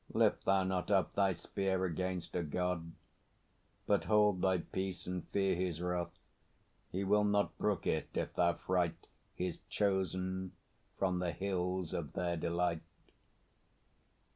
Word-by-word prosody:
Lift - - +3
thou 95 -1 +4
not 95 0 -1
up 95 -2 +3
thy 100 -1 +3
spear 95 0 -1
Against 90 0 -2
a 90 - +1
God, 85 +1 -2 0.9
but 100 - +2
hold 105 -3 +4
thy 95 0 +3
peace, 95 +1 -4
and 90 -1 -4
fear 95 -1 +2
His 90 -2 -1
wrath! 90 -1 -2 0.7
He 95 +2 -1
will 105 +2 +4
not 105 0 +2
brook 105 -3 0
it, - - 0
if - - -1
thou 85 -1 +3
fright 90 -2 -1 0.3
His 90 -2 -2
Chosen 95 -2 0 0.4
from 90 -2 +1
the 90 -1 0
hills 90 0 -1
of - - -3
their 85 -1 0
delight. 85 0 0
90 Hz, 140 wpm, -35 LUFS, 90-95 Hz, 0.9 s, thou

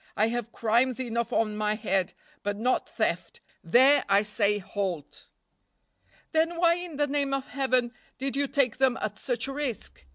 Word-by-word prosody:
I 215 +2 +3
have 235 -1 -3
crimes 235 +3 +1
enough 235 -2 -2
on 215 -2 +1
my 210 0 0
head, 195 -3 -1 0.3
but 205 0 -2
not 250 +4 0
theft, 180 -6 -2 0.2
there 260 +11 +5
I 200 +1 +5
say 210 -1 +1
halt." 185 -6 -5 1.0
"Then 325 +1 +2
why 340 0 +5
in 350 -3 -6
the 290 - +2
name 280 -1 0
of 270 -1 -3
Heaven 255 -2 0 0.2
did 270 +1 -3
you 280 0 +1
take 260 -5 +1
them 265 -1 +3
at - - -4
such - - -2
a 275 - -4
risk?" 270 - -4
240 Hz, 170 wpm, -27 LUFS, 210-275 Hz, 1.0 s, there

